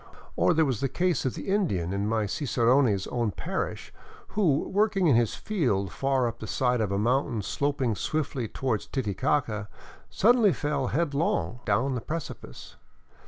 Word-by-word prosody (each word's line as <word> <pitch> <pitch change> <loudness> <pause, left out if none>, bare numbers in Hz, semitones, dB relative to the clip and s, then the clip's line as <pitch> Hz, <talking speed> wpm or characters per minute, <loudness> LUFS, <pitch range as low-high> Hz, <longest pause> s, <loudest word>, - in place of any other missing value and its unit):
Or 175 - +3
there 160 0 +4
was 130 -6 -1
the 135 - 0
case 180 0 0
of 130 - -1
the - - -7
Indian 100 - 0
in 100 +1 -1
my 110 -1 +1
cicerone's 120 -3 +2
own 120 -3 -1
parish 80 -5 -4 0.4
who, 170 -9 +1
working 200 -1 +1
in 145 -7 +5
his 115 -2 +2
field 120 - -1
far 135 +6 +1
up 115 0 -5
the - - -7
side 125 -2 +1
of 105 -3 -1
a 100 - 0
mountain 120 0 0
sloping 140 -1 0
swiftly 135 0 -2
toward 120 -3 -2
Titicaca, 110 -2 -1 0.4
suddenly 220 -3 +4
fell 145 -3 -1
headlong 140 - 0
down 115 +6 +1
the 125 - -3
precipice. 160 +6 -7
130 Hz, 160 wpm, -27 LUFS, 110-150 Hz, 0.4 s, in